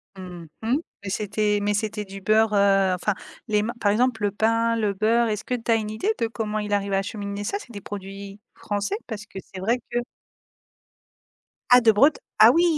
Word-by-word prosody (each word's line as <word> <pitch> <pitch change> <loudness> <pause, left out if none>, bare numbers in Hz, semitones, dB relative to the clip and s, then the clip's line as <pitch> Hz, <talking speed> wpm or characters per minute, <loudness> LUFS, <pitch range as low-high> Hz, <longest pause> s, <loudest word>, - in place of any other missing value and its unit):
Mmh 180 -3 -9 0.2
mh, 230 +4 +2 0.3
mais 200 - -4
c'était 210 +1 0
mais 205 0 +1
c'était 210 0 -2
du 195 0 -9
beurre, 215 +2 +3
heu, 195 -2 +4
enfin, 200 +3 0 0.3
les 210 -2 +2
ma 225 +3 -2
par 205 - +2
exemple 225 0 +1
le 205 - +2
pain, 230 +2 +1
le 215 -3 0
beurre, 225 +4 +2
est-ce 210 -2 -2
que - - -4
tu 240 -1 -4
as - - +6
une 215 -1 -2
idée 300 - 0
de 230 - +1
comment 215 -1 -3
il 210 -1 -3
arrive 200 -1 0
à - - +3
acheminer 200 0 -4
ça? 305 - -2
C'est 250 - -13
des 205 -3 -8
produits 195 0 -8 0.2
français? 205 - -2
Parce 215 -2 -6
que - - -12 0.2
c'est 190 - -6
vrai 230 +6 +2
que 240 - +1 1.7
Ah, 250 0 +8
de 230 -2 +6
Bret 280 +9 +5 0.3
ah, 220 +2 +9
oui, 335 - +4
210 Hz, 210 wpm, -24 LUFS, 200-225 Hz, 1.7 s, ah